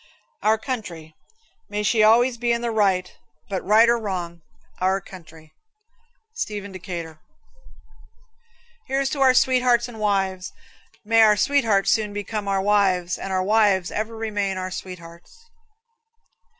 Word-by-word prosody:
Our 220 +1 +3
Country. 185 - -6 0.6
May 210 0 -3
she 215 +1 +2
always 235 +3 +4
be 240 0 0
in 235 0 0
the 235 -1 -2
right 195 -4 0 0.3
but, 190 -2 -3
right 215 +4 +5
or 235 0 +3
wrong, 175 -5 -5 0.4
Our 190 +1 +1
Country. 160 -5 -15 0.8
Stephen 205 - -5
Decatur. 170 -4 -7 1.7
Here's 270 0 -1
to 280 - -3
our 260 -1 +5
sweethearts 250 -2 +3
and 240 -2 -11
our - - -9
wives. 190 -3 -1 0.5
May 225 +1 +4
our 210 -1 +5
sweethearts 225 -7 +2
soon 215 -3 0
become 205 0 -5
our 195 -1 0
wives 190 -3 +1
and 195 - -6
our 185 0 0
wives 200 -3 +2
ever 220 +2 -4
remain 205 -3 -2
our 185 0 -4
sweethearts. 170 - -10
205 Hz, 135 wpm, -22 LUFS, 185-225 Hz, 1.7 s, right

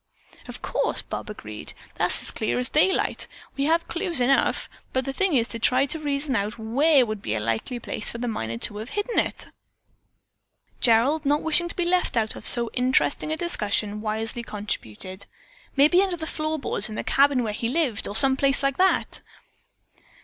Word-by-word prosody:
"Of - - -9
course," - - 0
Bob - - -6
agreed. - - -8 0.2
"That's - - +2
as - - -1
clear 215 - -1
as 250 0 +3
daylight. 345 +5 +2 0.3
We 275 - 0
have 330 +2 +2
clues 340 -3 -1
enough, 260 +2 +2 0.3
but 260 0 0
the 270 - -3
thing 385 0 +1
is 235 -2 +2
to 230 - -4
try 255 +3 +3
to 320 +3 -5
reason 285 -2 -1
out 210 +1 -1
where 265 +5 +3
would 215 -2 -5
be 105 - -2
a - - -1
likely 115 - -2
place 215 - -2
for - - -4
the 245 +1 -3
miner 115 - -3
to 205 - -3
have 220 +4 -6
hidden 415 +6 -1
it." - - -2 1.3
Gerald, 255 +6 +3
not 290 +1 +1
wishing 320 +2 +2
to - - -8
be 350 - -1
left 360 -7 +1
out 220 -1 0
of - - -2
so 235 -2 +2
interesting 260 +4 +1
a 315 - -1
discussion, 210 - -1
wisely 220 +2 -3
contributed, 200 - -5 0.5
"Maybe 300 +7 +5
under 380 -3 0
the 320 - -4
floor 310 0 -2
boards 215 -7 0
in 215 - -6
the - - -3
cabin 275 -2 +3
where 215 -2 -2
he 230 +2 -2
lived, 265 -7 0
or 205 - -5
some 265 +3 +6
place 275 +1 +1
like 275 -1 +1
that." 380 +1 +1
260 Hz, 195 wpm, -24 LUFS, 220-310 Hz, 1.3 s, some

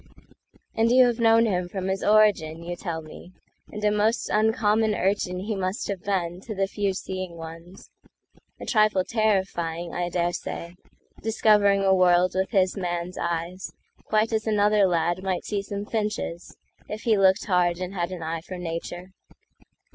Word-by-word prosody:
And 225 +1 +2
you 255 +1 +6
have 240 -1 0
known 230 0 +5
him 180 -4 -1
from 190 0 -4
his 190 0 -2
origin, 205 -7 +3
You 175 +1 -4
tell 170 -3 -5
me; 175 +3 -13 0.4
and 210 - -7
a 210 - +4
most 210 +3 +1
uncommon 215 0 +2
urchinHe 195 +1 -1
must 190 +1 -2
have 195 -3 -3
been 180 -2 -2
to 215 +1 -7
the 195 0 +1
few 200 -1 -2
seeing 185 -2 -5
ones—A 165 +3 -14
trifle 215 -4 +3
terrifying, 185 -6 -1
I 175 0 -2
dare 175 0 0
say, 170 0 -6 0.5
Discovering 210 -2 +3
a 190 0 +4
world 180 -1 +4
with 190 +1 0
his 190 -4 +2
man's 175 -2 -4
eyes, 170 +2 -3 0.3
Quite 220 +1 +1
as 220 0 -1
another 210 -1 +3
lad 175 +1 0
might 190 -2 -2
see 205 -2 -2
some 200 0 -5
finches, 210 -6 -3 0.3
If 215 +1 -5
he 225 -2 +3
looked 190 -1 +3
hard 180 -3 +2
and 185 +1 -5
had 175 -2 -2
an 175 -3 -6
eye 165 +1 -3
for 185 +2 -8
nature. 175 +1 -6
190 Hz, 160 wpm, -25 LUFS, 175-210 Hz, 0.5 s, you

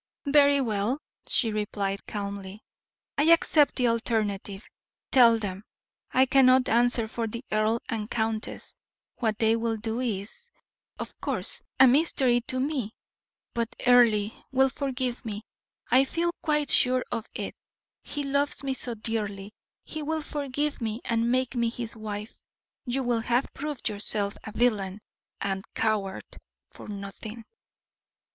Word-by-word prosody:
"Very 285 0 +5
well," 220 +1 0 0.3
she 225 -4 +1
replied, 200 -2 -2
calmly; 200 0 -5 0.6
"I 290 - +4
accept 320 -2 +5
the 250 -2 +2
alternative; 215 -3 -1 0.5
tell 235 -3 +7
them. 200 -2 -5 0.5
I 260 +1 +5
cannot 260 -1 +5
answer 235 0 +3
for 230 +1 -3
the 235 +4 -6
earl 215 +2 +2
and 215 -1 -3
countess; 220 -1 -2 0.4
what 220 -3 0
they 225 0 +3
will 230 -1 -1
do 225 +2 -3
is, 240 - -4 0.5
of - - -6
course, - - -2 0.2
a 265 - +9
mystery 255 -3 +3
to 255 - -1
me; 260 -6 -2 0.6
but 230 -1 -2
Earle 230 -4 +5 0.2
will 265 0 +4
forgive 260 -2 -2
me, 215 -2 -5 0.5
I 260 +3 +6
feel 340 +4 0
quite 300 -2 +1
sure 255 0 +5
of 225 - -3
it; - - -4 0.5
he 290 - -3
loves 280 +1 0
me 270 -1 0
so 245 -2 -4
dearly, 210 -2 -4 0.3
he 315 - -6
will 315 +1 -2
forgive 290 0 -2
me 225 +1 -2
and 230 -1 +1
make 255 0 +1
me 235 -2 +1
his 235 -1 -5
wife. 215 0 -7 0.4
You 260 +1 -1
will 240 -2 +1
have 240 +3 0
proved 290 -2 -4
yourself 205 -1 -1
a 220 - -6
villain 210 -4 +1 0.4
and 195 -1 -2
coward 210 -3 0 0.5
for - - -11
nothing." 210 +2 -7
230 Hz, 140 wpm, -27 LUFS, 215-260 Hz, 0.6 s, a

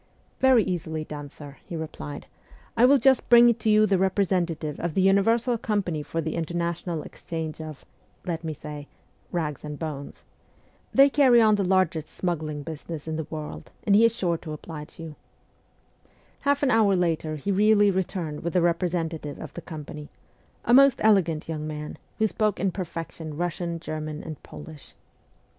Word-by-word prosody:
' - - -38
Very 260 -4 +5
easily 160 -4 -3
done, 145 -2 -7
sir,' 140 -1 -11
he 170 - -7
replied. 150 - -6 0.3
' - - -25
I 240 - +5
will 280 +2 +6
just 265 +1 +3
bring 240 0 +8
to 220 -1 -2
you 215 0 +6
the 195 -3 +2
representative 180 -5 0
of 170 -2 -3
the 190 - +3
Universal 225 +5 +3
Company 195 -9 -1
for 165 +2 -3
the 160 0 -3
International 170 0 -2
Exchange 160 -1 -6
of 155 -3 -9 0.4
(let 170 -2 -3
me 160 - -3
say) 150 0 -8 0.4
Bags 155 -5 -3
and 150 -1 -6
Bones. 145 -3 -6 0.7
Tliey 275 0 +7
carry 260 -5 +6
on 220 -2 +5
the 205 -1 +2
largest 180 -4 +1
smuggling 155 -5 -3
business 160 0 -7
in 160 - -2
the 160 -1 -4
world, 155 -1 -7
and 200 - +4
he 220 - +6
is 230 0 +4
sure 170 -6 0
to 155 -2 -7
oblige 150 0 -9
you.' 160 -2 -8 1.2
Half 285 0 +1
an 265 - +3
hour 215 -4 +4
later 165 -3 0
he 155 +7 -2
really 205 +1 +4
returned 180 -5 -3
with 170 - -3
the 180 - +3
representative 165 -3 -1
of 155 - -8
the 175 - -7
company 150 -2 -8 0.6
a 240 - +3
most 275 0 +7
elegant 180 -8 +3
young 155 -2 -4
man, 150 -1 -6 0.2
who 220 - +2
spoke 215 -1 0
in 195 0 +1
perfection 165 -4 -6
Kussian, 170 0 -2
German, 155 -1 -5
and 155 -3 -8
Polish. 150 -1 -11
170 Hz, 175 wpm, -26 LUFS, 155-200 Hz, 1.2 s, bring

